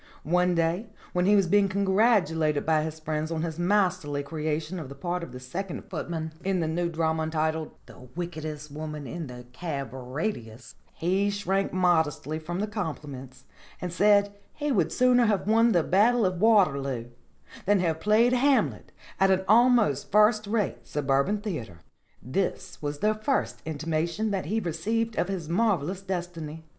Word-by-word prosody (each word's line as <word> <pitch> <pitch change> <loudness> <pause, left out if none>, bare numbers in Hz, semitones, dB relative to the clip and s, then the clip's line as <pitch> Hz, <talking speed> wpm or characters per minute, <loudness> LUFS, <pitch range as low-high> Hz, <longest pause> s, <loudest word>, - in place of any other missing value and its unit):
One 180 +3 +2
day 170 +6 0 0.2
when 180 +1 +1
he 205 - +6
was 195 -2 +4
being 200 +2 +3
congratulated 190 -6 +2
by 155 -1 +3
his 160 0 -5
friends 155 0 -2
on 165 -1 -2
his 165 0 -4
masterly 180 -6 +1
creation 155 +3 -3
of 145 -5 -7
the 140 - -9
part 175 +5 -3
of 170 - -7
the 125 - -8
second 175 +9 -5
footman 160 -2 -4
in 190 -1 0
the 165 - 0
new 170 +2 -1
drama 160 -1 0
entitled 160 0 -1
'The 125 0 -14
Wickedest 155 -4 -5
Woman 150 0 -6
in 165 +1 -5
the 125 -1 -10
Cab 140 -5 -4
Radius,' 125 - -5 0.2
he 190 +4 +1
shrank 195 -1 -1
modestly 160 -4 +1
from 175 +4 -4
the - - +1
compliments 145 - -6 0.4
and 180 -1 -5
said 205 +1 +4 0.2
he 295 -1 -2
would 180 - +1
sooner 250 -1 +4
have 205 -3 +1
won 225 +2 +4
the 175 -6 +3
Battle 220 +6 +3
of 185 -1 -1
Waterloo 140 - +2 0.6
than 205 -1 +4
have 165 -3 0
played 220 +6 +4
Hamlet 270 +2 +2 0.3
at 195 - +4
an 190 0 +2
almost 225 - +4
first 215 0 +4
rate 210 -2 -2
suburban 145 +8 0
theater. 120 - -6 0.4
This 180 - -3
was 145 -1 -4
the 215 +1 +3
first 220 +6 -1
intimation 165 +6 -2
that 190 -5 -2
he 215 +5 0
received 220 +6 -2
of - - +1
his 185 -5 -4
marvellous 185 -2 0
destiny. 170 -4 -5
175 Hz, 165 wpm, -27 LUFS, 155-205 Hz, 0.6 s, he